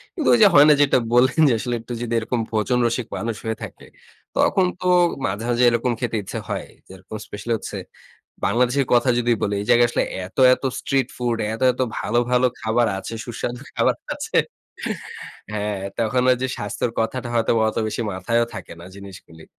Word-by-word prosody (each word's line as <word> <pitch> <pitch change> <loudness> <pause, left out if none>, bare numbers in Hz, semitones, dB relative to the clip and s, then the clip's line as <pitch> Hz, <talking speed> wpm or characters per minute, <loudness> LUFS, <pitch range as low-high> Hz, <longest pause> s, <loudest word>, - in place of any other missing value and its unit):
কিন্তু 315 - -2
ওই 240 - +6
যে - - +9
হয় 145 +1 +8
না 150 - +8
যেটা 140 - +4 0.2
বললেন 125 +4 +4
যে 120 - +3
আসলে 120 +1 -2
একটু 120 +1 -7
যদি 120 -1 -3
এরকম 115 +2 -2
ভোজন 115 +3 +1
রসিক 115 0 -1
মানুষ 115 +3 -3
হয়ে 110 0 -2
থাকে, - - -10 0.5
তখন 190 -2 +3 0.2
তো 180 - -1 0.4
মাঝে, 100 +4 -3
মাঝে 120 +1 +2
এরকম 120 +1 0
খেতে 120 -3 -2
ইচ্ছা - - -5
হয়। - - -3 0.2
যেরকম 95 +3 -11
স্পেশালি 105 +3 -4
হচ্ছে - - -7 0.7
বাংলাদেশের 125 +3 +2
কথা 120 +2 +4
যদি 120 0 +2
বলি। 100 0 0
এই - - -8
জায়গায় 120 0 +6
আসলে - - 0 0.2
এত, 95 - -17 0.2
এত - - -16 0.2
স্ট্রিট 135 -3 0
ফুড 120 -2 -1 0.2
এত, 110 - -6
এত 125 - -8 0.2
ভালো, 120 +2 0
ভালো 125 0 +4
খাবার 115 +2 +1
আছে, 105 - -6
সুস্বাদু 120 +1 -5 0.2
খাবার - - +2 0.2
আছে। - - -4 1.2
হ্যাঁ, 105 -1 -2 0.2
তখন 115 +2 +1
ওই 125 - +4
যে 130 - 0
স্বাস্থ্যের 105 +3 -3
কথাটা 120 +2 -2
হয়তোবা 115 -1 +2
অত - - -14
বেশি 115 - -3
মাথায়ও 115 +5 0
থাকে - - -8
না 85 - -10
জিনিসগুলি। 90 -5 -12
120 Hz, 185 wpm, -22 LUFS, 110-125 Hz, 1.2 s, যে